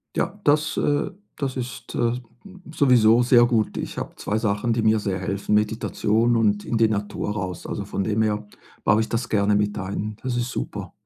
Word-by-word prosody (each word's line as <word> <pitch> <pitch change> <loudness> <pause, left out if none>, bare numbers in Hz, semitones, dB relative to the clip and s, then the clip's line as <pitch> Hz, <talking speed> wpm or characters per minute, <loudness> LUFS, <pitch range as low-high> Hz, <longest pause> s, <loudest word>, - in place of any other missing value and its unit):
Ja, 190 +5 -2
das 155 +1 +2
äh, 145 0 +1 0.3
das 135 -3 -2
ist, 125 -1 -6
äh, 115 0 +2 0.6
sowieso 120 -3 +5
sehr 120 -1 +6
gut. 115 -3 0
Ich - - -5
habe - - -5
2 105 - -2
Sachen, 110 +1 0
die 115 - 0
mir 110 0 +3
sehr 100 -2 -2
helfen. 100 +2 -1
Meditation 110 +2 +1
und 105 -2 +2
in 115 - -1
die 110 -1 +4
Natur 105 -1 -2
raus. 95 -4 -4
Also, - - -4
von 100 - -2
dem 110 +2 0
her 105 -1 0 0.4
baue 105 +1 +4
ich 110 - -2
das 115 +1 -2
gerne 105 -1 +2
mit 105 0 0
ein. 100 +2 -4
Das 130 -2 -2
ist 120 0 -1
super. - - -5
110 Hz, 195 wpm, -23 LUFS, 105-120 Hz, 0.6 s, sehr